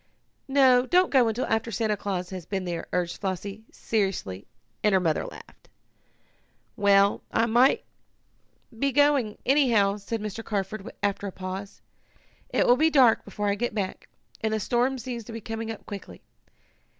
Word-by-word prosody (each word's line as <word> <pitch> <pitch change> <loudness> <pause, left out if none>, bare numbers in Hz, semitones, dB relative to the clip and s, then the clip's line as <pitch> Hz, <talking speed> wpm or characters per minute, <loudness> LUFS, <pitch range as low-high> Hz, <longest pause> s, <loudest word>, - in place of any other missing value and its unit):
"No, 260 -2 +4
don't 360 +5 +3
go 255 -4 +5
until 225 +3 -1
after 225 +1 0
Santa 215 0 0
Claus 190 -3 -4
has 185 -3 -7
been 190 -2 -3
here," 170 -2 -4
urged 175 -1 -2
Flossie 200 +2 -4
seriously, 190 - -2 0.4
and 210 - +3
her 190 - +5
mother 165 -4 0
laughed. - - -14 1.1
"Well, 200 -1 +4
I 225 - +2
must 240 +4 +4 1.0
be 275 +2 +1
going, 280 -6 +3
anyhow," 235 -8 +3
said 215 +3 -4
Mr. 215 +1 -5
Carford, 205 +1 -4
after 205 0 -1
a - - -5
pause. 190 +2 -7 0.7
"It - - +2
will 245 - +5
be 315 +3 +4
dark 260 -7 +5
before 205 0 -2
I - - +2
get 225 +2 -3
back, 195 -3 -4 0.3
and 220 - +1
the - - -1
storm 245 +5 +1
seems 240 -2 -5
to 230 - -9
be 225 - -5
coming 225 +1 -5
up 225 - -7
quickly. 200 -2 -9
215 Hz, 160 wpm, -26 LUFS, 195-240 Hz, 1.1 s, go